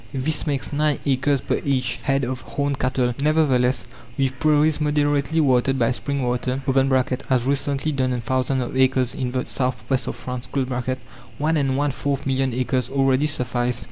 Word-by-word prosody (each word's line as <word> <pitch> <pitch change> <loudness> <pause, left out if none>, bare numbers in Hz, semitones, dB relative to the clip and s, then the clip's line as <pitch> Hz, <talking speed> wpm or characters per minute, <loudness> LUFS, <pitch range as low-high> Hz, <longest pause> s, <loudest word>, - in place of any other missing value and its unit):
This 145 +4 0
makes 140 -1 -2
nine 150 0 +2
acres 140 0 +1
per - - -1
each 130 -3 0
head 135 +3 0
of 130 0 -3
horned 140 +2 -2
cattle. 125 -1 +1
Nevertheless, 140 -5 +2 0.3
with 135 -1 0
prairies 155 0 +3
moderately 150 +1 +1
watered 135 -1 +2
by 120 -1 +2
spring 140 +2 -2
water 125 +2 -1 0.7
(as 125 -2 +2
recently 140 +2 0
done 130 -3 0
on 125 -1 -2
thousands 130 +2 0
of 120 - -6
acres 130 -1 +2
in 130 -3 -3
the 125 0 -2
southwest 125 0 -1
of - - -3
France), 125 0 -6 0.9
one 155 +3 +1
and 135 -3 +1
one 145 0 +1
fourth 140 +1 -2
million 135 -1 +1
acres 125 0 -1
already 135 +1 +2
suffice. 125 -3 -1
135 Hz, 165 wpm, -22 LUFS, 125-145 Hz, 0.9 s, prairies